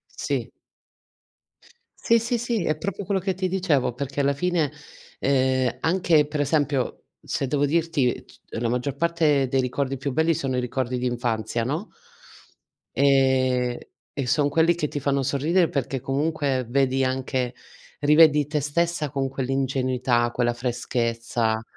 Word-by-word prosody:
Sì. - - -2 1.5
Sì, 230 - +4
sì, 235 +1 -1
sì, 235 -4 -1
è 155 - 0
proprio 200 +4 -4
quello 195 0 0
che 190 +1 -1
ti 185 0 -1
dicevo, 170 -10 +1
perché 140 +2 -3
alla 140 0 +2
fine, 165 -1 0 0.5
ehm, 130 -2 +1
anche 165 -3 +3
per 150 0 -4
esempio, 145 -2 0 0.2
se - - -2
devo 145 +2 +1
dirti 155 -5 0
c - - -20 0.2
la 115 0 0
maggior 125 +3 -2
parte 155 -3 +2
dei 130 +1 +1
ricordi 135 +1 -2
più 140 +2 -3
belli, 160 +5 +2
sono 135 -4 -2
i - - +2
ricordi 125 0 -2
d'infanzia, 120 -2 -1
no? 150 - -2 1.1
Ehm 130 -2 +3 0.4
e 140 -3 -3
son 145 +3 +2
quelli 165 +3 +3
che 155 -4 -2
ti 145 - -4
fanno 140 0 0
sorridere, 155 +6 +1
perché 135 -1 -2
comunque, 140 -2 -1
vedi 135 +1 +1
anche 130 -1 -2 0.5
rivedi 150 0 +5
te 150 0 -1
stessa, 155 +1 -1
con 135 -1 -2
quell'ingenuità, 130 -2 0
quella 120 -1 0
freschezza, 115 -2 -1
140 Hz, 145 wpm, -24 LUFS, 125-155 Hz, 1.5 s, rivedi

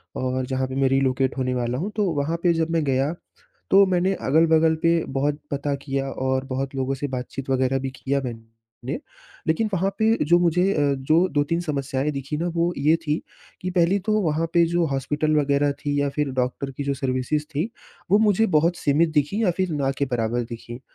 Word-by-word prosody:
और 130 0 -1
जहाँ 130 0 -1
पे 130 - -6
मैं 135 - +4
रिलोकेट 135 0 +1
होने 130 -1 0
वाला 120 0 -1
हूँ। 190 +9 -3
तो 210 -2 +1 0.2
वहाँ 160 +4 -1
पे 175 -1 +4
जब 165 0 0
मैं 165 -1 +1
गया 135 +2 +1 0.6
तो 195 +1 +7
मैंने 185 0 +1
अगल-बगल 160 +2 +4
पे 165 0 +3
बहुत 145 +2 0
पता 140 0 -1
किया 135 -1 -2
और 130 0 -1
बहुत 135 0 -3
लोगों 135 0 -1
से 145 +2 -3
बातचीत 130 +1 -5
वग़ैरह 130 0 +1
भी 135 0 -3
किया 140 +2 -1
मैंने 115 - -8 0.5
लेकिन 165 +8 +1
वहाँ 190 +1 +1
पे 220 +1 +3
जो 175 +3 +5
मुझे 175 0 +2
अ, 145 -4 +2
जो 155 +7 +2
2-3 145 +3 +1
समस्याएँ 140 -3 -2
दिखी 140 +1 -4
ना 170 +3 -1
वो 170 +1 +1
ये 150 +3 +4
थी 150 -1 0 0.4
कि 185 - -2
पहली 180 +2 +2
तो 215 +3 -1
वहाँ 160 -2 0
पे 170 -1 +5
जो 170 0 +1
हॉस्पिटल 150 +3 0
वग़ैरह 145 0 +2
थी 145 -1 -1
या 145 - +1
फिर 145 0 -1
डॉक्टर 125 +2 -2
की 145 - -2
जो 140 0 0
सर्विसेस 135 +2 -1
थी 155 +9 -1 0.4
वो 205 - +7
मुझे 215 0 +3
बहुत 170 +3 +2
सीमित 155 +3 +2
दिखी 150 +10 +1
या 185 - +3
फिर 185 -2 0
ना 140 -3 0
के 140 - +1
बराबर 120 0 0
दिखी। 120 0 -8
145 Hz, 205 wpm, -23 LUFS, 135-165 Hz, 0.6 s, तो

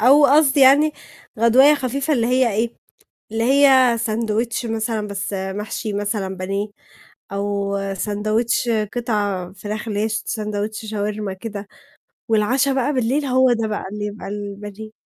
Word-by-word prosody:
أو 280 +6 +6
قصدي 285 0 +4
يعني 285 +3 +6 0.5
غدواية 260 +6 +6
خفيفة، 275 +2 -2
اللي 235 -5 +2
هي 250 -1 +2
إيه، 230 +2 -1 0.6
اللي 225 +1 -1
هي 260 -2 +5
ساندويتش 225 +1 -1
مثلًا 220 -1 -2
بس 200 0 -4
محشي 200 +2 -4
مثلًا 200 -2 -2
بانيه، 195 +3 -2 0.6
أو 200 0 -2 0.2
ساندويتش 215 +4 0 0.2
قطع 205 -6 -2
فراخ 210 +3 -6
اللي 205 -2 -2
هي 220 - 0
س 220 - -2
ساندوتش 215 0 -3
شاورما 210 -1 -3
كده، 205 0 -7 0.6
والعَشا 245 +6 +2
بقى 265 +2 0
بالليل 260 +4 0
هو 260 -1 +4
ده 225 -1 -1
بقى 210 - -3
اللي 210 0 -4
يبقى 210 0 -7
البانيه. 205 +1 -7
220 Hz, 140 wpm, -21 LUFS, 205-250 Hz, 0.6 s, أو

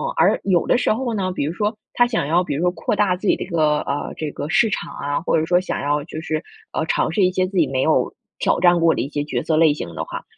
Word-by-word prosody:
而 - - +3
有 180 -4 +2
的 - - +3
时 240 - +2
候 240 +1 -2
呢 185 -3 -1
比 - - -2
如 150 - -1
说， 210 +4 -1 0.2
他 240 - +4
想 235 - -1
要 170 +4 +3
比 160 - -3
如 150 - -2
说 180 0 +2
扩 185 - -2
大 200 -2 +2
自 200 - -5
己 - - +4
的 - - -5
一 - - -9
个， 155 -4 +2
呃， 140 +1 -3
这 155 -2 -4
个 145 - -5
市 215 +6 +3
场 195 - -4
啊， 145 0 -2
或 165 - +1
者 160 - +1
说 175 +2 +3
想 185 - -3
要 145 +1 0
就 155 -1 -7
是， 155 -1 -2 0.3
呃， 160 - -1
尝 160 - 0
试 200 - 0
一 - - +3
些 185 0 +1
自 190 0 -5
己 165 -4 +4
没 130 0 -1
有 - - +2 0.3
挑 - - +2
战 175 0 +5
过 165 -1 +3
的 - - -1
一 135 - -4
些 145 - -2
角 125 -4 -2
色 160 - +1
类 160 -2 +5
型 85 - -7
的 - - -4
话， - - -7
170 Hz, 325 characters per minute, -21 LUFS, 150-185 Hz, 0.3 s, 战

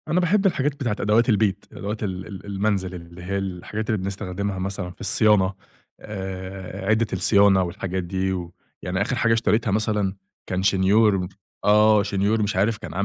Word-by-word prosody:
أنا 165 +4 +2
باحب 195 +3 +2
الحاجات 145 -6 +2
بتاعة 120 -7 -2
أدوات 110 +4 +3
البيت، 105 -3 +1
أدوات 105 +2 -5
ال 95 -2 -4
ال 100 -2 -9
المنزِل 100 -2 -1
اللي 85 0 -11
هي 100 +2 -2
الحاجات 95 +3 -4
اللي 110 - +2
بنستخدمها 95 0 -3
مثلًا 95 -1 -3
في - - -17
الصيانة 100 -1 +3 0.5
آآ، 95 -2 -6
عدة 110 +1 +3
الصيانة 100 0 +4
والحاجات 90 +1 -3
دي 95 +2 -1
و 90 -2 -5 0.3
يعني 95 +1 -2
آخِر 120 +5 0
حاجة 115 -1 +2
اشتريتها 115 -1 +1
مثلًا 105 -2 0 0.3
كان 95 0 -2
شنيور 95 0 +3 0.4
آه 105 0 +5
شنيور 105 +2 0
مش 105 -1 -1
عارف 105 +4 +2
كان 105 - -8
100 Hz, 165 wpm, -23 LUFS, 95-110 Hz, 0.5 s, آه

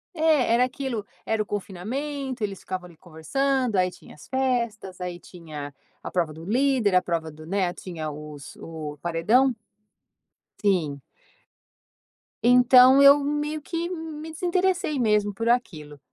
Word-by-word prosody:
É, 310 -7 +3
era 245 - +4
aquilo, 255 -4 -3 0.2
era 220 -1 0
o 210 - -2
confinamento, 250 +7 -4
eles 200 -2 -3
ficavam 185 -1 -5
ali 175 -2 -14
conversando, 235 - -1
aí 185 0 +3
tinha 180 - -15
as 150 - -15
festas, 235 -8 -2
aí 180 -1 -5
tinha 155 -6 -9 0.3
a - - -6
prova 170 -4 0
do 160 +2 -10
líder, 245 -2 +2
a 180 - +5
prova 165 -3 -3
do, 155 +1 -13
né, 185 -1 0
tinha 160 -4 -6
os 150 -1 -10
o 155 -2 -7
paredão. 215 +11 +2 1.1
Sim. 160 -9 +1 1.4
Então, 250 +2 +7
eu 280 +1 +8
meio 295 +2 -2
que 335 +2 -3
me 320 -2 -6
desinteressei 360 -2 0
mesmo 210 -3 +2
por 230 +4 -3
aquilo. 155 - -1
215 Hz, 140 wpm, -25 LUFS, 175-270 Hz, 1.4 s, eu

